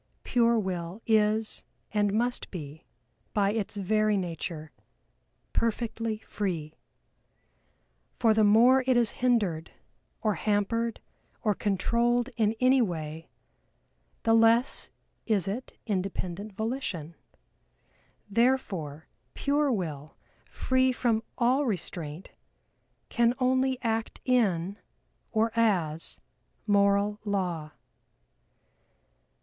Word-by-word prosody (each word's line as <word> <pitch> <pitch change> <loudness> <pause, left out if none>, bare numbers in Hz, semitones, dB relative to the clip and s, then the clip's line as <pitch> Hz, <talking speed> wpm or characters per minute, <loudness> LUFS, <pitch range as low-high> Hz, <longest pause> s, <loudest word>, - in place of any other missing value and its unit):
Pure 235 -1 +3
Will 185 -2 -3
is, 215 0 +2 0.3
and 205 -1 +1
must 240 +4 -1
be 155 -3 -8 0.5
by 200 -1 +3
its 215 -1 -3
very 215 +1 +2
nature, 165 -3 -4 0.8
perfectly 230 -1 -1
free, 165 -7 -3 1.4
for 225 -3 +4
the 215 0 +3
more 240 +6 +6
it 255 -2 +4
is 235 -3 +3
hindered, 205 -11 +1 0.5
or 215 -2 +2
hampered, 225 +3 -1 0.4
or 210 -3 +3
controlled 235 +6 +1
in 220 -1 +1
any 255 +1 +5
way, 160 -5 -4 0.9
the 225 - +3
less 230 +2 +4 0.4
is 205 -6 +1
it 225 +6 -5
independent 195 -1 -3
volition. 205 - -3 1.1
Therefore, 200 - 0 0.3
pare 285 0 +1
Will, 155 - -4 0.3
free 260 0 +2
from 235 -3 +1 0.2
all 260 +3 +2
restraint 170 -5 -4 0.8
can 235 0 +2
only 260 0 +1
act 225 -1 -2
in, 200 -6 +1 0.5
or 225 0 +2
as, 175 -9 0 0.5
Moral 200 0 +3
Law. 180 -7 -2
215 Hz, 95 wpm, -28 LUFS, 185-235 Hz, 1.4 s, more